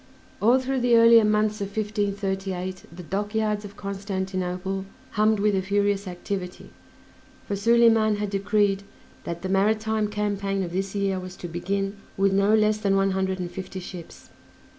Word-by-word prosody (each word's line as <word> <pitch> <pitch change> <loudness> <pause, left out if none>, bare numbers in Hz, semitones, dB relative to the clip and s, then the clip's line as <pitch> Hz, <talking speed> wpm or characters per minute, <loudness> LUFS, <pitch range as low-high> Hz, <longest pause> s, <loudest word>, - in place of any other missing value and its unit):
All 235 +5 +5
through 265 0 -1
the 245 -1 +4
earlier 230 0 +7
months 210 0 +1
of 200 - -1
1538 195 -3 -2
the 175 +2 -10
dockyards 210 +3 -1
of 205 0 -10
Constantinople 190 -1 -3 0.3
hummed 215 -1 +2
with 210 0 +2
a 190 - +1
furious 200 +1 0
activity, 180 0 -5 0.8
for 200 - -1
Soliman 225 0 +4
had 205 -1 -3
decreed 200 0 +1 0.4
that 170 +1 -5
the - - -2
maritime 215 +2 +1
campaign 200 -2 -1
of 175 - -5
this 195 +2 -2
year 195 -2 0
was 185 0 -8
to 175 - -7
begin 195 +4 -2 0.2
with 195 0 +3
no 200 +2 +4
less 215 0 +2
than 200 -2 +1
one 195 0 +2
hundred 190 0 -1
and 175 -1 -4
fifty 190 +1 -6
ships. 175 -2 -10
200 Hz, 160 wpm, -25 LUFS, 190-210 Hz, 0.8 s, earlier